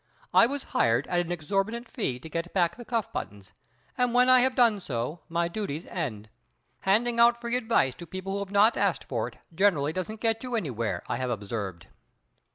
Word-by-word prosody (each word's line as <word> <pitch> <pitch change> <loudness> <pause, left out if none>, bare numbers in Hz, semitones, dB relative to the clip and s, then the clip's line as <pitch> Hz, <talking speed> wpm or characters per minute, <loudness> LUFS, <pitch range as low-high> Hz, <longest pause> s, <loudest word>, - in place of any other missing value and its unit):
I 230 - +7
was 280 +1 -3
hired 120 +3 +3
at 175 - +1
an 175 - -7
exorbitant 195 +8 -2
fee 200 - -2
to - - -8
get 165 +3 -4
back 175 -3 +2
the 240 - -9
cuff 230 -3 -2
buttons, 100 -1 -6 0.4
and 250 -1 +1
when 250 +1 +5
I 255 0 +8
have 255 +1 +2
done 235 -5 +4
so 135 0 -4
my 170 0 0
duties 170 -4 -4
end. 110 - -4 0.5
Handing 235 +5 +2
out 235 0 +6
free 235 0 -2
advice 225 - +2
to 170 - -8
people 185 +3 -5
who 200 - -1
have 200 -1 -5
not 205 +4 +4
asked - - +1
for - - -2
it - - -12 0.2
generally 160 -5 +2
doesn't 200 +5 -4
get 225 0 +1
you 250 -2 -3
anything, 125 - -2
I - - -1
have 130 0 -2
observed." 100 -5 -4
190 Hz, 200 wpm, -27 LUFS, 140-235 Hz, 0.5 s, I